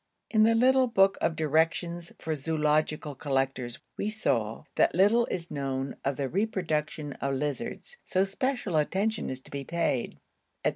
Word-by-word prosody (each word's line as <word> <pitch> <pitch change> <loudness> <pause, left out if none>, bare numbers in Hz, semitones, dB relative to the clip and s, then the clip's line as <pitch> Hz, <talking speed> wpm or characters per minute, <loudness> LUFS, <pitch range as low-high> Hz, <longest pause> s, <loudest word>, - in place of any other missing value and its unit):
In 215 - +4
the 225 0 +4
little 260 +2 +5
book 195 -4 +3
of 165 - +1
directions 165 +2 0
for 160 - -3
zoological 155 0 0
collectors 135 -3 -1 0.2
we 205 - -1
saw, 115 - -1
that - - +3
'little 210 +6 +4
is 175 -1 -4
known 135 -1 -2
of 140 0 0
the 140 -1 -1
reproduction 155 -5 -1
of 140 0 0
lizards, 150 - -4
so 185 +1 +1
special 210 - -1
attention 200 +8 0
is 130 0 -5
to - - -18
be 140 -1 -4
paid,' 160 -6 -1 0.5
&c. - - +5
160 Hz, 155 wpm, -28 LUFS, 140-195 Hz, 0.5 s, little